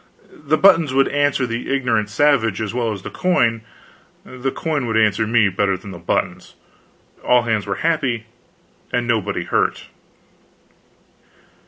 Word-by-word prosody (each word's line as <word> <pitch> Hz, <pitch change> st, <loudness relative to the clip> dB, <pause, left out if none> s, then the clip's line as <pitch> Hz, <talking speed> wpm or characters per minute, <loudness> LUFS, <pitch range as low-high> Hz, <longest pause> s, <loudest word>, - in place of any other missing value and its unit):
The 155 Hz, +2 st, +3 dB
buttons 165 Hz, -8 st, +4 dB
would 135 Hz, 0 st, +4 dB
answer 145 Hz, -2 st, +1 dB
the 115 Hz, +1 st, -4 dB
ignorant 120 Hz, -6 st, 0 dB
savage 115 Hz, -4 st, +2 dB
as 110 Hz, -1 st, -3 dB
well 120 Hz, -2 st, -1 dB
as 100 Hz, -3 st, -7 dB
the -, -, -7 dB
coin, 120 Hz, -11 st, +1 dB, 0.6 s
the 130 Hz, +1 st, -4 dB
coin 150 Hz, -7 st, -2 dB
would 115 Hz, -1 st, 0 dB
answer 110 Hz, 0 st, +2 dB
me 115 Hz, -2 st, +3 dB
better 95 Hz, 0 st, 0 dB
than 100 Hz, +2 st, -11 dB
the 85 Hz, -, -9 dB
buttons; 85 Hz, -, -3 dB, 0.7 s
all 125 Hz, -1 st, +3 dB
hands 110 Hz, -3 st, -1 dB
were 100 Hz, -, -2 dB
happy 135 Hz, -9 st, 0 dB, 0.7 s
and 125 Hz, 0 st, 0 dB
nobody 115 Hz, -4 st, -1 dB
hurt. -, -, -1 dB
120 Hz, 145 wpm, -20 LUFS, 110-140 Hz, 0.7 s, buttons